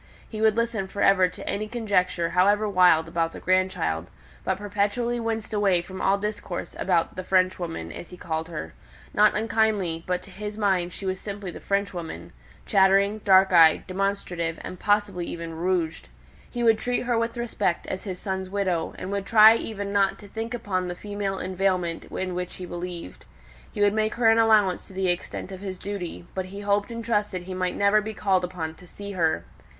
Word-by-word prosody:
He 215 -1 -6
would 220 0 +4
listen 230 -4 0
for 200 - -2
ever 185 -2 +5
to 180 - -10
any 210 +2 -2
conjecture, 190 -7 0
however 205 +4 +3
wild, 180 -5 +5
about 165 -1 -1
the - - -8
grandchild, 170 - 0 0.3
but - - 0
perpetually 205 +4 -1
winced 225 -1 -3
away 195 -4 +2
from 190 +1 -8
all 195 +1 +3
discourse 205 -3 -5
about 175 -3 +1
"the 185 - -5
Frenchwoman," 185 -2 0
as 170 - -9
he 180 - -11
called 160 -1 -3
her; 80 - -6 0.4
not 210 0 +5
unkindly, 210 -6 +1
but 180 0 -1
to 195 - -13
his 210 +2 -6
mind 190 -4 +1
she 195 - -8
was 185 0 -2
simply 200 -2 -6
the - - -9
Frenchwoman 175 - -3 0.3
chattering, 195 +2 +4
dark 190 -2 +5
eyed, 165 -2 +6
demonstrative, 185 -4 -2
and 185 - -7
possibly 205 -4 +1
even 165 -1 -6
rouged. 170 -1 -1 0.4
He 240 -1 -3
would 225 -2 +4
treat 245 0 0
her 245 -1 0
with 230 +1 -1
respect 225 -7 -1
as 190 - -5
his 185 -3 -4
son's 190 0 -4
widow, 185 -4 -1
and 185 - -5
would 200 -1 -2
try 220 0 +8
even 200 -3 -4
not 200 -1 +2
to 205 - -13
think 225 +3 -4
upon 190 -6 -2
the 175 - -4
female 205 0 -3
inveiglement 185 -3 -1
in 185 -1 -4
which 180 0 -4
he 185 - -7
believed. 175 - -7 0.5
He - - -4
would 205 0 +4
make 215 0 0
her 230 -2 +5
an 225 - +4
allowance 215 -5 +3
to - - -14
the 190 -1 0
extent 175 +2 -3
of 190 0 -8
his 190 -2 -5
duty: 185 -3 -6
but 190 -1 -3
he 200 +2 -8
hoped 205 +1 +1
and 230 -1 -6
trusted 210 -5 0
he 185 +1 -6
might 185 -1 -1
never 200 +1 +4
be 215 0 -6
called 190 -3 +1
upon 175 -3 -4
to 180 +2 -16
see 200 +3 -8
her. 160 - 0
190 Hz, 195 wpm, -25 LUFS, 180-210 Hz, 0.5 s, try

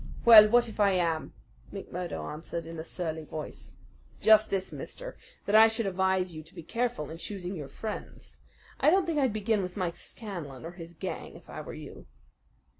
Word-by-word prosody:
"Well, 215 -2 +11
what 240 +1 +4
if 220 - -10
I 200 -2 +4
am?" 165 -3 0 0.4
McMurdo 180 -5 -5
answered 165 +2 -6
in 165 0 -7
a - - -4
surly 160 -2 -4
voice. 155 0 -7 0.5
"Just 220 0 +6
this, 190 -1 -2
mister, - - -7 0.3
that 200 - -2
I 220 +1 +9
should 225 0 -1
advise 190 -1 +1
you 155 - -7
to 160 +4 -18
be 170 - -8
careful 230 - -2
in 165 - -8
choosing 190 -1 -5
your 150 -5 -6
friends. 215 +8 -7 0.4
I - - +5
don't 375 +2 +4
think 330 -3 0
I'd 265 -4 +2
begin 215 0 0
with 180 +1 -5
Mike 180 -3 -2
Scanlan 170 - -6
or 165 - -6
his 170 -1 -10
gang - - -6
if - - -14
I - - -6
were - - -8
you." - - -10
190 Hz, 190 wpm, -29 LUFS, 165-220 Hz, 0.5 s, Well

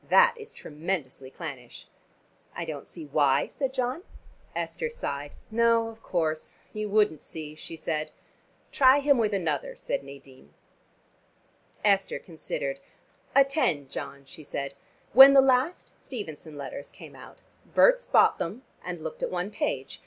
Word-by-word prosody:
That 485 0 +6
is 445 -1 -11
tremendously 150 -5 -5
clannish." 135 -6 -9 0.7
"I 170 - -3
don't 155 -3 -6
see 165 -3 -9
why," 140 -2 +3
said 270 -3 -3
John. 255 +4 -2 0.5
Esther 475 - -2
sighed. 145 - -5 0.2
"No, 230 0 +3
of 225 0 -13
course 160 -3 -2 0.2
you 215 0 -3
wouldn't 205 -7 +2
see," 155 -2 -7
she 165 +1 -9
said. 155 -1 -3 0.6
"Try 265 0 +6
him 280 -2 +3
with 215 -2 +2
another," 165 -7 -1
said - - -3
Nadine. 135 - -14 1.3
Esther 195 -2 +3
considered. - - -5 0.6
"Attend, 270 - +2
John," 140 0 -6
she 155 +3 -11
said. 140 -1 -4 0.4
"When 270 +2 +11
the 275 - +8
last 265 +5 +2
Stevenson 160 - -8
letters 140 0 -7
came - - -13
out, - - -14 0.3
Berts - - +5
bought - - +5
them 215 +10 -4 0.2
and 175 -3 -6
looked 160 - -6
at - - 0
one 180 +3 -3
page. 135 -9 -3
180 Hz, 140 wpm, -27 LUFS, -, 1.3 s, When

